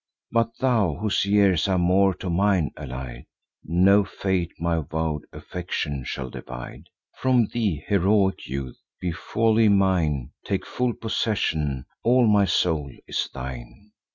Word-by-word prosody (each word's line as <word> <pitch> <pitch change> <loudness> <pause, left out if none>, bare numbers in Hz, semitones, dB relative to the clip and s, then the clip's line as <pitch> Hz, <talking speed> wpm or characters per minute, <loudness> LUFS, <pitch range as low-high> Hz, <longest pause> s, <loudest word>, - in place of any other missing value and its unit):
But 115 0 0
thou, 110 - +2
whose 105 +4 0
years 100 -4 +3
are 95 -1 +2
more 95 +2 +3
to 95 - -5
mine 95 -3 +2
allied, 65 -3 -7 0.4
No 95 +5 +4
fate 95 -3 -2
my 85 0 0
vow'd 80 0 -3
affection 75 -6 -4
shall 65 -1 -5
divide 60 -1 -8 0.3
From 130 -3 +3
thee, 100 -11 -1
heroic 100 0 +2
youth! 65 -1 -5 0.2
Be 90 - -2
wholly 110 +5 +2
mine; 85 -10 +2
Take 100 -2 -2
full 125 -1 -1
possession; 80 - -1 0.2
all 125 +1 +4
my 105 -2 +4
soul 80 -7 0 0.2
is - - -2
thine. 65 - -8
90 Hz, 130 wpm, -24 LUFS, 75-105 Hz, 0.4 s, No